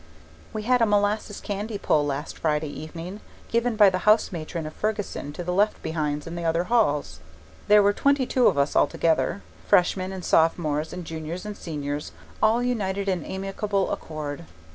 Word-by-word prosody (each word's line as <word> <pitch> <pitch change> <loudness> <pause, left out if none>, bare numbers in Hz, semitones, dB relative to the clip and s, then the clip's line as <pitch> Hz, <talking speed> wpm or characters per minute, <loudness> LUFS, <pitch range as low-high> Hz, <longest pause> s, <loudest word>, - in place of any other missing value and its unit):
We 215 - -4
had 250 +2 +3
a 230 - +5
molasses 205 0 +1
candy 205 +1 -4
pull 150 -6 +2
last 145 +1 -4
Friday 150 -1 0
evening, 165 +6 -7 0.3
given 235 0 +1
by 205 -3 +7
the 185 - -1
house 210 +4 +4
matron 165 -1 -5
of 155 - -6
Fergussen 210 -8 -3
to 175 - -5
the 180 +1 -2
left 205 +3 +2
behinds 150 -2 -2
in 165 - -7
the 170 0 -4
other 165 +1 +1
halls. 150 - +1 0.5
There 210 0 +7
were 205 0 +4
twenty 280 +3 +2
two 250 0 +3
of 170 - +2
us 140 +1 +1
altogether, 165 +6 +2 0.2
Freshmen 185 +1 +3
and 190 -2 -6
Sophomores 160 -2 +2
and 180 -1 -6
juniors 160 +4 -6
and 210 -1 -5
Seniors 145 -4 -5 0.3
all 225 +3 +3
united 200 -5 -1
in 185 -4 0
amicable 195 +1 -2
accord. 150 - -5
185 Hz, 175 wpm, -25 LUFS, 155-210 Hz, 0.5 s, by